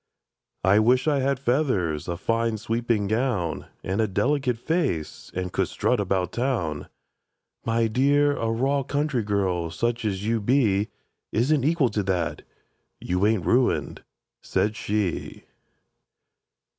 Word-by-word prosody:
—"I 95 +3 +5
wish 125 +6 +3
I 145 -2 +3
had 135 0 +1
feathers, 120 - 0
a 85 -1 -2
fine 115 +3 0
sweeping 115 0 -1
gown, 110 -6 -1 0.2
And 95 +4 0
a 110 - +2
delicate 125 +5 0
face, 130 - -2
and 90 0 -3
could - - +1
strut 125 - 0
about 95 -2 0
Town!"— 115 - -2 0.8
"My 115 0 +2
dear—a 140 +1 +2
raw 135 +5 +1
country 140 -1 -1
girl, 95 -5 0
such 120 +7 -1
as 100 -2 -2
you 115 0 +1
be, 105 -4 +2 0.4
Isn't 135 +4 +2
equal 150 -3 +2
to 105 0 -1
that. 95 -3 -1 0.6
You 90 +3 +1
ain't 110 -6 +1
ruined," 125 +1 +1 0.4
said 105 +1 0
she. 105 -5 -2
115 Hz, 130 wpm, -25 LUFS, 95-130 Hz, 0.8 s, I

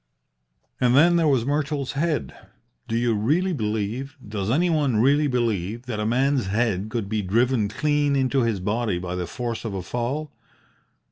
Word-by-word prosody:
"And 125 0 +3
then 170 +5 +6
there 165 -2 +3
was 130 -5 +2
Myrtle's 145 -1 -1
head. 155 +2 -1 0.5
Do 115 - -2
you 120 -1 +1
really 155 - +1
believe 110 +3 -3
does 100 -1 -3
anybody 150 -2 +2
really 140 +7 +3
believe 115 -4 -1
that 115 -4 -4
a 105 - -1
man's 130 0 +1
head 105 -1 0
could 110 -3 -3
be 110 +1 -1
driven 110 +2 +1
clean 145 +4 +1
into 135 0 +2
his 115 -4 0
body 105 0 -1
by 90 0 -4
the 90 -1 -3
force 120 +4 -4
of 110 -4 -4
a 95 - -4
fall? 130 - -3
120 Hz, 165 wpm, -24 LUFS, 105-140 Hz, 0.5 s, then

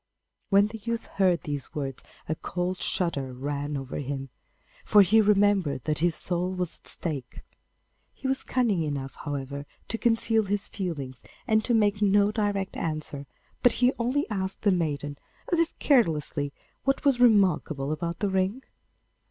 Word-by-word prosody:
When 200 -1 +6
the 220 +1 -6
youth 230 +2 -3
heard 185 -3 +1
these 145 -5 -5
words 135 -3 -4 0.2
a 155 - 0
cold 180 +3 -3
shudder 160 -8 -1
ran 145 +2 -3
over 135 -1 -5
him, 135 -1 -4 0.5
for 210 -1 +6
he 220 +4 +5
remembered 200 - +3
that 155 -1 -1
his 170 0 +2
soul 180 +1 -1
was 180 -2 -3
at - - -16
stake. 140 -7 -3 0.7
He 265 - -6
was 265 0 +1
cunning 230 -9 +1
enough, 140 -3 -3
however, 140 0 -5 0.2
to 225 - -1
conceal 225 -2 +2
his 205 +1 0
feelings 145 - -5 0.2
and 220 0 +3
to 240 - +2
make 205 -1 +2
no 205 0 +4
direct 205 -3 -1
answer, 155 -3 -4 0.3
but 245 - +5
he 250 +2 +3
only 255 +5 0
asked 190 -1 -2
the 205 - +4
maiden, 145 -5 -1 0.3
as 340 - +3
if 335 -1 0
carelessly, 155 - +2 0.3
what 275 +1 0
was 270 -3 +4
remarkable 180 - +3
about 170 +2 -3
the 205 - +1
ring? 190 +7 0
185 Hz, 160 wpm, -27 LUFS, 145-210 Hz, 0.7 s, When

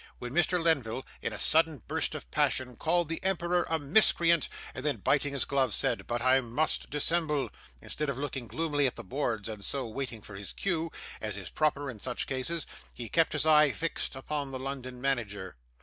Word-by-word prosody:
When 120 +1 -6
Mr. 175 +2 +3
Lenville 135 -7 +1 0.2
in - - -2
a - - -5
sudden 160 -5 +3
burst - - -1
of - - -8
passion 125 -2 +1
called 175 +1 +1
the 165 +1 -3
emperor 180 -2 +1
a 160 - +2
miscreant, 170 +1 +4 0.2
and 130 - -6
then 150 -1 +1
biting 145 0 +2
his 140 - 0
glove, 135 -5 +1
said, - - +1
'But 120 0 -1
I 130 +1 +5
must 130 +6 0
dissemble,' 150 -1 0 0.3
instead 150 -1 -2
of 135 - -2
looking 135 -3 -4
gloomily 145 +4 +1
at 125 - -3
the 120 - -7
boards 115 -2 -2
and 105 -3 -6
so 135 +3 -2
waiting 115 -2 -5
for 100 - -11
his 100 0 -5
cue, 165 -4 -1 0.3
as - - -3
is - - -7
proper 145 -2 +1
in 120 -5 -6
such 125 +3 -2
cases, 140 +5 -1 0.3
he 120 -3 -7
kept 165 -1 +3
his 150 0 +3
eye 150 -1 +7
fixed 165 0 -2
upon 140 +1 -3
the 130 - -4
London 130 -1 -5
manager. 105 -9 -2
140 Hz, 195 wpm, -30 LUFS, 125-160 Hz, 0.3 s, eye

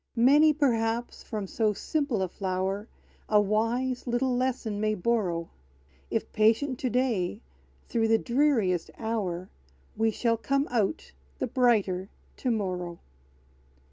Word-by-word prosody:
Many, 285 +6 +6
perhaps, 235 -5 0
from 210 -3 -4
so 215 +2 0
simple 260 -1 -1
a - - 0
flower 190 +3 -2 0.4
A 210 - +5
wise 230 +5 0
little 245 +1 +1
lesson 245 -5 -1
may 215 0 +1
borrow: 180 -5 -1 0.6
If 225 - -2
patient 230 +5 +2
to 255 - -1
day 230 - 0 0.5
through 225 -1 +1
the 225 0 +4
dreariest 235 - +1
hour, 195 -6 -3 0.4
We 225 0 +2
shall 230 +1 0
come 275 +4 0
out 220 -5 -1 0.3
the - - -1
brighter 205 -7 +2 0.3
to 255 - -2
morrow! 180 -6 -2
225 Hz, 125 wpm, -28 LUFS, 200-250 Hz, 0.6 s, Many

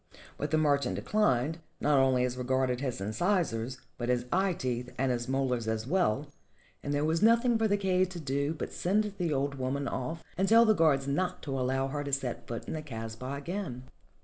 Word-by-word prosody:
But 145 - -3
the 155 - +2
merchant 145 -2 +2
declined, 160 - +1 0.2
not 145 -2 +3
only 130 -1 +3
as 125 0 -2
regarded 130 0 0
his 130 -6 -2
incisors, 120 - 0 0.2
but 120 0 -2
his 125 -1 +1
eye 190 +1 +2
teeth 125 -4 -3
and 130 0 +1
his 120 0 -2
molars 130 -4 0
as 110 0 -1
well, 150 - +1 0.6
and 145 - -4
there 145 +1 +1
was 160 +2 +1
nothing 235 +2 +5
for 225 0 +2
the 205 -1 +2
kaid 185 -2 +2
to 180 -2 -7
do 140 +1 -1
but - - -5
send 210 +3 +1
the 170 -3 0
old 140 -1 -1
woman 135 +2 -1
off 130 +6 -4 0.2
and 195 - +2
tell 230 +1 +7
the 220 - +5
guards 155 -7 +3
not 180 +6 -1
to 145 - -5
allow 135 0 0
her 145 +1 -3
to 140 - -5
set 135 -3 -2
foot 115 -1 -5
in - - -3
the 155 - -3
kasbah 115 -1 -6
again. 145 -4 -4
140 Hz, 205 wpm, -30 LUFS, 125-175 Hz, 0.6 s, tell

